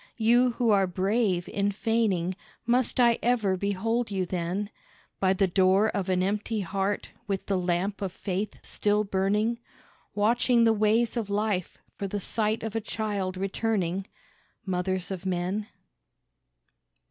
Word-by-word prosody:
You 240 +2 +4
who 235 -2 +2
are 195 -2 +4
brave 190 0 0
in 200 0 0
feigning 200 -4 0 0.3
must 245 +2 +2
I 235 -2 +5
ever 230 -6 +2
behold 205 +5 -1
you 190 -2 -1
then 180 +4 -3 0.5
By 190 -1 +3
the 195 +1 +2
door 190 +3 +3
of 195 -2 -2
an 185 0 +2
empty 210 +2 -1
heart 195 +2 -2 0.2
with 195 -2 -2
the 200 - 0
lamp 180 +3 -1
of 195 -2 -2
faith 195 +3 -3
still 210 0 +1
burning, 210 +4 0 0.6
Watching 235 +3 +3
the 225 -1 +5
ways 220 +3 +2
of 220 -3 -2
life 200 -3 -1 0.2
for 200 - -2
the 205 +1 -3
sight 215 +2 -1
of 220 -1 -4
a 225 - 0
child 205 -4 -3
returning, 195 -2 -1 0.6
Mothers 185 0 -1
of 185 -2 -4
Men? 185 +4 -1
200 Hz, 145 wpm, -27 LUFS, 190-220 Hz, 0.6 s, I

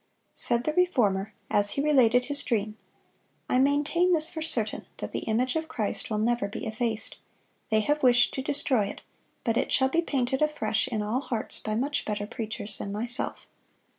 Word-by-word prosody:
" - - -45
Said 235 0 +3
the 305 - -1
Reformer, 220 - +1 0.2
as 205 0 +5
he - - +2
related 250 -5 +4
his 285 +1 +1
dream, 215 -2 -1 0.7
"I 255 - +2
maintain 295 +6 +2
this 315 -1 +5
for 320 - -5
certain, 240 -9 -2
that - - -6
the - - -4
image 250 +5 +1
of 320 0 -2
Christ 230 -10 -2
will 215 - -1
never 230 -1 0
be 200 - -6
effaced. 220 0 -2 0.5
They 220 0 +3
have 295 +7 0
wished 245 -1 +4
to 265 - -3
destroy 265 -5 +1
it, 200 - -7 0.4
but 230 0 0
it - - 0
shall 265 0 +4
be 335 +5 +2
painted 265 -4 -1
afresh 225 -9 +1
in 220 -4 -2
all 220 +5 -1
hearts 230 -6 -3
by 215 0 -3
much 285 +5 -1
better 205 -1 -3
preachers 220 -2 -5
than 200 - -5
myself." 235 +5 -3
245 Hz, 190 wpm, -27 LUFS, 215-285 Hz, 0.7 s, as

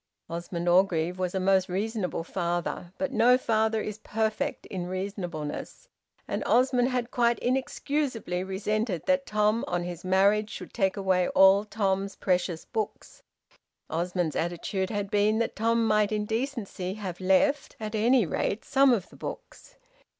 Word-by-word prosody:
Osmond 170 +1 -4
Orgreave 180 -1 +2
was 185 0 -2
a - - +1
most 190 0 +2
reasonable 195 -2 -2
father, 175 0 -3
but 280 -1 -2
no 250 0 +5
father 220 -2 +1
is 215 0 -5
perfect 220 +7 -2
in 180 -3 -5
reasonableness, 185 -5 -5 0.4
and - - -2
Osmond 250 0 +3
had 250 -2 -2
quite 235 -1 +2
inexcusably 255 -6 -1
resented 195 -1 -2
that 275 0 +1
Tom 215 +2 +2
on 175 0 -1
his 175 -1 -6
marriage 200 +3 +3
should - - -8
take 195 -3 +1
away 185 -2 +2
all 195 +1 +6
Tom's 200 -2 -1
precious 180 -3 -1
books. 215 -1 -5 0.7
Osmond's 175 0 -1
attitude 175 +3 -2
had 205 -2 -3
been 210 +1 +3
that 230 - -1
Tom 230 +1 +2
might 215 -1 +2
in 210 -1 -1
decency 220 -5 -3
have 190 -4 -6
left, 275 +10 +2
at 215 0 -5
any 230 +1 +3
rate, 200 +6 -2
some 275 -1 +4
of 200 -6 -1
the - - -16
books. - - -9
205 Hz, 150 wpm, -27 LUFS, 180-225 Hz, 0.7 s, all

